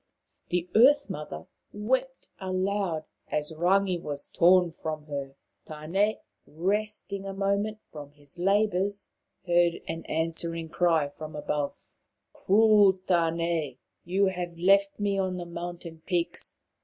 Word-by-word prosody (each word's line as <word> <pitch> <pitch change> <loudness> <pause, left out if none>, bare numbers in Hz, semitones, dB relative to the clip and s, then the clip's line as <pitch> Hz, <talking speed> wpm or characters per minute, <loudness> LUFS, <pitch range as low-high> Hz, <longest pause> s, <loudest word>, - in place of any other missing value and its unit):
The 175 0 0
Earth 275 +1 +5
mother 150 - -6 0.3
wept 260 +5 -2
aloud 185 -3 -1 0.2
as 150 +1 -2
Rangi 180 +2 +2
was 145 -2 -4
torn 180 0 +4
from 155 -1 -5
her. 140 -2 -5 0.3
Tane, 170 +8 0 0.3
resting 200 +3 -2
a 195 - -5
moment 200 +2 0
from 145 -2 -11
his 145 +2 -11
labours, 200 +1 +1 0.3
heard 175 -1 +3
an 165 0 -4
answering 165 0 -2
cry 165 -4 +2
from 155 +2 -9
above. 150 -1 -3 0.3
" - - -55
Cruel 210 -1 +5
Tane! 165 -5 0 0.3
You 190 +3 +2
have 175 -2 -3
left 195 +3 +3
me 200 -1 0
on 185 -1 -1
the 175 - -5
mountain 170 -1 -7
peaks. 175 -3 -3
175 Hz, 125 wpm, -28 LUFS, 160-200 Hz, 0.3 s, Earth